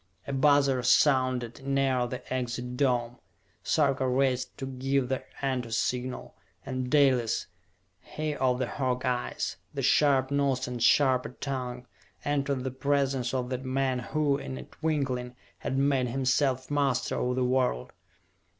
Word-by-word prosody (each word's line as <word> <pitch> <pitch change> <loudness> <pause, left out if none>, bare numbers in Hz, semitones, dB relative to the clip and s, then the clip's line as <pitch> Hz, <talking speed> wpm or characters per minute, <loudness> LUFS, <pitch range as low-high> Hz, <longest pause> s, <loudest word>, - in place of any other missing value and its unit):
A 140 - -4
buzzer 140 -1 +4
sounded 130 -1 +2
near 135 -2 +1
the 125 +1 -6
Exit 125 0 -3
Dome. 125 -3 0 0.5
Sarka 135 -3 +2
raced 130 0 0
to 135 - -4
give 135 0 -1
the 130 - -1 0.2
"Enter" 125 -3 -1
Signal 125 +3 -2 0.3
and 130 -1 -3
Dalis, 130 -6 +3 0.5
he 155 0 -4
of 125 -2 +1
the 130 - 0
hawk 125 -1 -2
eyes, 125 -1 -2 0.2
the - - -2
sharp 135 -3 +3
nose 140 -2 +1
and 125 -1 -5
sharper 130 +1 +4
tongue, 125 -3 -4 0.4
entered 140 -2 0
the 130 - -2
presence 135 -2 0
of 130 -1 -2
the 130 - -1
man 130 0 -1
who, 145 +2 0
in 130 -1 -6
a - - -7
twinkling, 130 -6 -2 0.2
had 135 - -2
made 135 -2 +2
himself 130 +1 0
master 140 -3 +1
of 125 0 0
the 130 -1 +1
world. 125 - 0
130 Hz, 140 wpm, -28 LUFS, 125-140 Hz, 0.5 s, buzzer